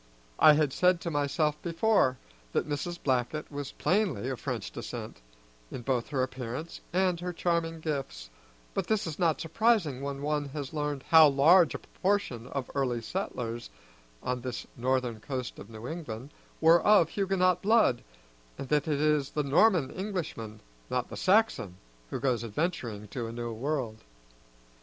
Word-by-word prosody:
I 155 - +9
had 150 -3 +2
said 180 -1 +3
to 170 - -3
myself 145 +1 0
before 170 -6 +2 0.4
that - - 0
Mrs. 150 +4 -3
Blackett 130 +4 -1
was 145 -1 -5
plainly 175 - 0
of 130 - -4
French - - -4
descent, - - -7 0.5
in 120 - -7
both 125 -2 0
her 135 -3 0
appearance 130 +4 -5
and 180 -1 +1
her 180 +1 -3
charming 170 -2 -1
gifts, 135 - -4 0.4
but - - -2
this 220 -2 +1
is 160 -3 -5
not 165 -4 +2
surprising 165 - +1
when 140 0 -4
one 150 0 0
has 140 0 -6
learned 150 -3 -2
how 160 -1 +9
large 160 +6 +5
a - - -1
proportion 185 - -2
of 135 -1 -3
the - - -14
early 130 -4 0
settlers 120 - -4 0.5
on 125 0 -2
this 125 -2 -5
northern 125 -2 0
coast 130 +1 -5
of 100 - -10
New 110 +1 -8
England 140 -5 -6 0.3
were 165 +2 +6
of 205 -6 +5
Huguenot 185 -2 +1
blood, 210 - +4 0.6
and 135 - -7
that 150 -1 +2
it 150 -2 0
is 150 -2 +2
the 150 - -1
Norman 160 +1 +4
Englishman, 170 - -5 0.3
not 125 -1 -1
the - - -7
Saxon, 185 - +2 0.3
who - - -3
goes 125 -2 0
adventuring 115 - -3
to 120 -3 -4
a - - -6
new 120 0 -4
world. 120 -2 -3
145 Hz, 160 wpm, -29 LUFS, 125-170 Hz, 0.6 s, I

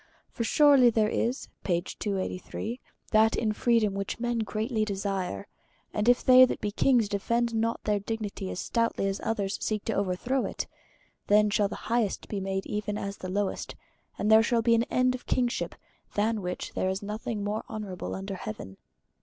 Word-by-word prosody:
For 235 - -3
surely 280 0 +6
there 220 -2 +2
is 240 +4 -1 0.2
that 205 +4 -1
in 215 -2 +1
freedom 225 -2 +2
which 195 +2 -4
men 240 0 -1
greatly 220 +1 -1
desire, 195 -1 -3 0.5
and 210 +3 +2
if 245 - +4
they 255 0 +9
that 255 - +2
be 210 - -2
kings 240 0 +3
defend 235 +4 0
not 225 +1 0
their 210 -1 +1
dignity 205 -2 -4
as - - -4
stoutly 230 -4 0
as 195 0 -2
others 205 -3 -1
seek 215 -2 -1
to 225 - 0
overthrow 200 +8 0
it, - - -4 0.6
then 210 0 +5
shall 205 0 +3
the - - -6
highest 230 -4 0
be 205 - -2
made 195 0 -2
even 210 0 -3
as 200 0 -4
the 185 - -6
lowest, 200 +1 -2 0.4
and 210 - +1
there 220 0 +8
shall 230 0 +1
be 230 0 +4
an 230 +1 +3
end 255 0 +2
of 255 - -8
kingship, 245 -1 0 0.4
than 215 +1 +1
which 180 -1 -4
there 185 - 0
is 190 +2 -3
nothing 210 +1 -4
more 210 +2 -2
honorable 210 -5 -5
under 195 +1 -5
heaven." 105 - -7
215 Hz, 175 wpm, -28 LUFS, 200-230 Hz, 0.6 s, they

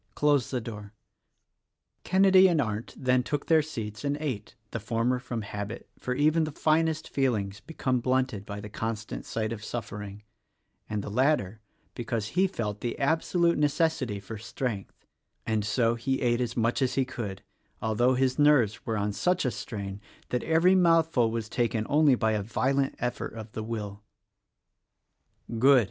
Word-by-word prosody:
close 145 -4 +2
the 130 - -1
door." 105 -3 -8 1.1
Kenedy 190 0 +6
and 165 -3 +2
Arndt 110 -3 -2
then 130 -1 +2
took 145 +3 -3
their 160 -1 +5
seats 115 -8 -6
and 145 0 0
ate 125 -9 -4
— 105 - -43
the 115 - -3
former 115 +4 0
from 120 -3 -4
habit, 105 +2 -6
for 125 - -2
even 155 +4 +3
the 155 - -2
finest 160 +1 +1
feelings 105 -8 -1
become 130 -4 -1
blunted 130 -4 0
by 100 0 -6
the 105 - -7
constant 110 0 -4
sight 110 0 -2
of 105 -2 -8
suffering 105 -3 -6 0.3
— - - -45
and 105 -1 -2
the - - -6
latter 115 -4 +1 0.3
because 115 -2 -3
he 185 +7 +2
felt 105 - -4
the 120 - -3
absolute 165 +4 +2
necessity 145 - +1
for 100 +2 -8
strength: 110 -2 -5 0.4
and 110 -1 0
so 115 +2 +2
he 130 +3 -1
ate 120 0 +2
as 120 -1 -2
much 115 +3 +1
as 130 - +1
he 135 - +2
could, 110 -7 -6 0.4
although 120 +4 +2
his 130 +2 +1
nerves 145 -8 +4
were 110 -1 0
on 105 0 -1
such 180 - +1
a 125 - +1
strain 100 -3 -6 0.3
that 125 - 0
every 165 +3 +4
mouthful 165 -9 +4
was 115 -1 -3
taken 115 -1 0
only 150 -2 +5
by 110 -2 +1
a 105 -1 0
violent 135 +6 0
effort 125 -2 -3
of 110 -1 -8
the 110 - -5
will. 105 -3 -5 1.6
"Good!" 135 +2 +7
120 Hz, 170 wpm, -28 LUFS, 110-145 Hz, 1.6 s, Good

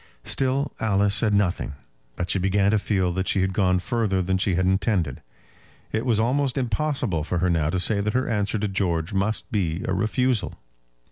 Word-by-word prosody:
Still 135 +1 0
Alice 100 -2 +2
said 110 0 +2
nothing, 95 -7 0 0.4
but 90 0 -2
she 95 - +2
began 95 +2 +2
to 110 - +3
feel 95 -4 0
that 95 +1 -2
she 95 - +1
had 95 0 0
gone 95 -2 +2
further 100 0 0
than 95 +1 0
she 95 -1 +1
had 95 +1 +1
intended. 95 - 0 0.7
It 110 +4 -2
was 115 -3 +3
almost 130 +4 +1
impossible 125 - -1
for 90 +3 -2
her 90 +1 +1
now 80 -3 +1
to 90 +2 0
say 100 +2 +1
that 105 +1 -1
her 130 - +1
answer 105 -2 0
to 105 0 -1
George 90 -3 -1
must 100 +3 -1
be 90 -5 -1
a 95 - 0
refusal. 110 +4 0
100 Hz, 195 wpm, -24 LUFS, 90-110 Hz, 0.7 s, to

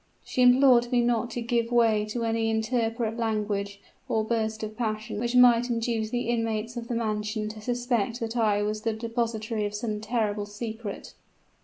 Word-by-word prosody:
She 255 - -2
implored 250 -1 +6
me 245 - +3
not 235 0 +1
to 240 +1 -4
give 235 0 0
way 225 -3 +3
to 230 +2 -3
any 225 0 0
intemperate 225 0 -1
language 210 -3 -2 0.3
or 220 - +1
burst 220 -1 -1
of 215 0 -5
passion 215 -2 -3
which 240 +2 -1
might 245 -1 +6
induce 230 -2 -1
the 245 0 -2
inmates 230 0 -1
of 235 -1 -5
the 240 - -2
mansion 215 -1 -2
to 215 0 -9
suspect 240 -1 -1
that 230 0 -4
I 210 -3 +2
was 215 +1 -2
the 225 0 -1
depositary 225 -1 -2
of 205 - -6
some 210 -1 -3
terrible 215 -2 -1
secret. 220 0 -6
225 Hz, 175 wpm, -27 LUFS, 215-240 Hz, 0.3 s, implored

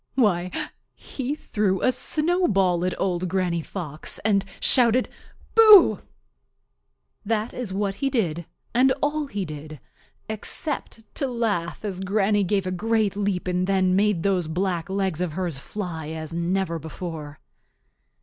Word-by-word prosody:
Why, 185 -8 +2 0.5
he 270 +2 -4
threw 205 -9 -1
a 255 - +4
snowball 255 - +1
at 185 - -2
Old 185 -1 0
Granny 180 -2 0
Fox 155 -3 -6
and 200 -3 +3 0.2
shouted 245 -1 +3 0.4
"Boo!" 435 -4 +8 1.2
That 220 +1 -1
is 245 -6 -5
what 195 0 -1
he 275 - +2
did 170 - -1 0.3
and 255 +2 +4
all 295 0 0
he 205 -7 -3
did, 155 -1 -8 0.5
except 225 +2 -4
to 275 - -2
laugh 215 -7 -2
as 190 -3 -4
Granny 205 +1 +2
gave 195 0 0
a 185 - -2
great 215 +1 0
leap 200 -3 -1
and 180 0 0
then 190 -1 +2
made 200 -4 +2
those 185 -4 +1
black 175 +1 -2
legs 190 -4 -1
of 175 -4 -2
hers 170 -5 -3
fly 165 -3 -5
as 160 0 -5
never 170 0 -1
before. 160 -2 -7
195 Hz, 140 wpm, -24 LUFS, 175-220 Hz, 1.2 s, Boo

